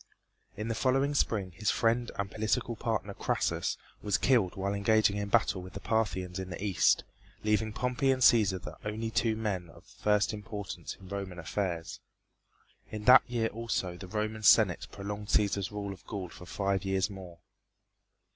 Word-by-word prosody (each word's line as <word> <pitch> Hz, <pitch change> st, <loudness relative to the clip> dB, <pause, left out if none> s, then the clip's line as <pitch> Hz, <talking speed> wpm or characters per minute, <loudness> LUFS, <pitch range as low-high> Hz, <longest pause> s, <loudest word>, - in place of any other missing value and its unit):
In 105 Hz, +2 st, -3 dB
the 115 Hz, -, 0 dB
following 135 Hz, +5 st, +1 dB
spring 100 Hz, -9 st, 0 dB
his 105 Hz, +4 st, -1 dB
friend 120 Hz, +1 st, +2 dB
and 100 Hz, -1 st, -3 dB
political 115 Hz, +2 st, -1 dB
partner, 110 Hz, -3 st, -2 dB
Crassus, -, -, -1 dB, 0.2 s
was 105 Hz, -2 st, +1 dB
killed 115 Hz, -9 st, +2 dB
while 100 Hz, +1 st, -1 dB
engaging 100 Hz, 0 st, +3 dB
in 100 Hz, 0 st, -3 dB
battle 105 Hz, -4 st, +2 dB
with 90 Hz, 0 st, -10 dB
the 100 Hz, -, -6 dB
Parthians 95 Hz, -5 st, -1 dB
in 95 Hz, -1 st, -5 dB
the 90 Hz, +1 st, -6 dB
east, 100 Hz, -4 st, +3 dB, 0.4 s
leaving 105 Hz, +1 st, +1 dB
Pompey 125 Hz, +4 st, 0 dB
and 130 Hz, -1 st, +2 dB
Cæsar 105 Hz, -6 st, +5 dB
the -, -, -8 dB
only 110 Hz, +2 st, -3 dB
two 115 Hz, -1 st, +1 dB
men 100 Hz, -6 st, -3 dB
of -, -, -16 dB
first 105 Hz, 0 st, +1 dB
importance 105 Hz, -1 st, -6 dB
in 95 Hz, -, -13 dB
Roman 100 Hz, -2 st, -5 dB
affairs. 85 Hz, -1 st, -3 dB, 0.9 s
In 105 Hz, -1 st, -6 dB
that 125 Hz, +3 st, +9 dB
year 115 Hz, -2 st, 0 dB
also 105 Hz, -5 st, -2 dB
the 95 Hz, +1 st, -9 dB
Roman 110 Hz, +2 st, -3 dB
Senate 105 Hz, -, +5 dB
prolonged 105 Hz, +1 st, -6 dB
Cæsar's 100 Hz, -2 st, +1 dB
rule 100 Hz, -1 st, -4 dB
of 95 Hz, -, -15 dB
Gaul 95 Hz, -4 st, -5 dB
for 90 Hz, -, -12 dB
five 100 Hz, -1 st, -1 dB
years 95 Hz, -1 st, +1 dB
more. 90 Hz, -3 st, -10 dB
105 Hz, 170 wpm, -30 LUFS, 95-110 Hz, 0.9 s, that